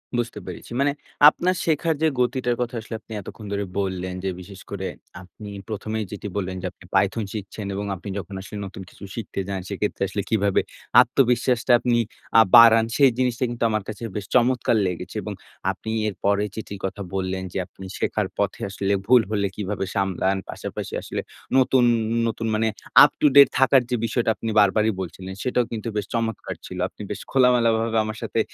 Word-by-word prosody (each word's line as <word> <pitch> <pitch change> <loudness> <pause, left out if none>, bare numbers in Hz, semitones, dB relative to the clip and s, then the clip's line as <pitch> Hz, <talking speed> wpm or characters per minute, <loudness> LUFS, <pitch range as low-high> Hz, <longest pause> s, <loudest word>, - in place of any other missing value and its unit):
বুঝতে 120 -3 -2
পেরেছি। 90 +4 -9
মানে 140 +1 +3 0.4
আপনার 180 +4 0
শেখার 160 0 +1
যে, 160 - +4
গতিটার 125 -1 +1
কথা 120 0 -2
আসলে 110 +1 -7
আপনি 110 - -20
এতক্ষণ 105 +3 -10
ধরে 100 0 -1 0.2
বললেন 95 -2 -2
যে, 95 - 0
বিশেষ 95 +1 -11
করে - - -4 0.3
আপনি 95 +3 -11 0.2
১ম 110 0 -5
এই 110 - -2
যেটা 105 0 -6
বললেন 95 -1 -2
যে, - - -5
আপনি - - -20
python 115 -2 +2
শিখছেন 105 0 -6
এবং 100 +1 -3
আপনি 95 +3 -8
যখন 95 +1 -8
আসলে 105 +2 -8
নতুন 95 0 -8
কিছু - - -15
শিখতে 110 -4 -5
যান, 100 -1 -3
সেক্ষেত্রে 105 +1 -3
আসলে 100 +1 -3
কিভাবে 100 -3 +2 0.4
আত্মবিশ্বাসটা 125 0 +2
আপনি 120 0 +1 0.4
আ - - +10
বাড়ান, 115 0 +8
সেই 135 -3 +6
জিনিসটা 125 -1 0
কিন্তু 120 -1 -4
আমার 110 -2 -1
কাছে 105 +2 -7
বেশ 105 -2 -3
চমৎকার 125 -1 +3
লেগেছে 90 -2 -5
এবং - - -4 0.4
আপনি 110 - -8 0.2
এরপরে 100 0 0
চিঠির 100 -3 -7
কথা 100 +1 -4
বললেন 95 0 -2
যে, - - -4
আপনি 95 +1 -12
শেখার - - -1
পথে - - -1
আসলে 100 0 -1
ভুল 125 0 +7
হলে 100 -2 +1
কীভাবে 100 -1 -3
সামলান। 95 0 +1
পাশাপাশি - - -6
আসলে - - -4 0.4
নতুন, 130 -1 +4 0.4
নতুন 115 0 -3
আ - - 0
মানে 110 +1 +1 0.4
up - - +6
to - - +6
date 140 0 +9
থাকার 135 0 +5
যে, 125 - +1
বিষয়টা 115 +1 0
আপনি 115 - -4
বারবারই 105 +2 +4
বলছিলেন, 95 +2 -7
সেটাও 125 -1 +1
কিন্তু 115 0 -4
বেশ 105 - -1
চমৎকার 115 -2 -2
ছিল। 90 - -8
আপনি - - -13
বেশ 100 - -4
খোলামেলাভাবে 115 -3 +3
আমার 110 0 -5
সাথে 115 0 -1
110 Hz, 185 wpm, -23 LUFS, 100-120 Hz, 0.4 s, আ